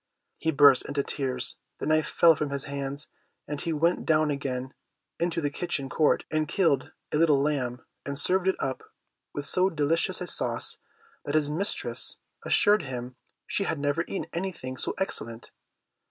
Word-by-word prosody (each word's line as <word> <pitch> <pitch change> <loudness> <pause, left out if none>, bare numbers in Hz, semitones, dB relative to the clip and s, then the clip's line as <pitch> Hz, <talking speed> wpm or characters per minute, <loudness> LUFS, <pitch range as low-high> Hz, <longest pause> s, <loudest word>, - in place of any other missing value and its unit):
He 160 - 0
burst 140 -3 +6
into 145 -1 0
tears, 130 -3 -2 0.2
the - - -4
knife 155 0 +3
fell 165 -1 +6
from 150 -1 -2
his 140 -1 -2
hands, 140 +1 -4 0.4
and 145 -1 -3
he 170 - -1
went 165 +3 +2
down 155 -1 +3
again 130 -2 -3 0.5
into 170 -1 0
the 145 -1 0
kitchen 140 -4 -2
court 155 +2 +3
and 155 -1 +1
killed 150 -7 +2 0.2
a - - +1
little 155 -3 +5
lamb, 135 -4 -1 0.2
and 140 0 -4
served 185 +4 +2
it 190 - +3
up 130 - -2 0.5
with 145 - -3
so 185 +5 +2
delicious 165 +3 +1
a 180 - -3
sauce, - - -2 0.4
that 145 - -2
his 150 -1 +3
mistress 195 +7 -1 0.3
assured 210 +1 +4
him 125 -2 -6 0.3
she 200 - 0
had 160 - -1
never 145 +3 0
eaten 195 - -3
anything 170 -8 -4
so - - -2
excellent. 115 - -3
150 Hz, 170 wpm, -28 LUFS, 140-165 Hz, 0.5 s, burst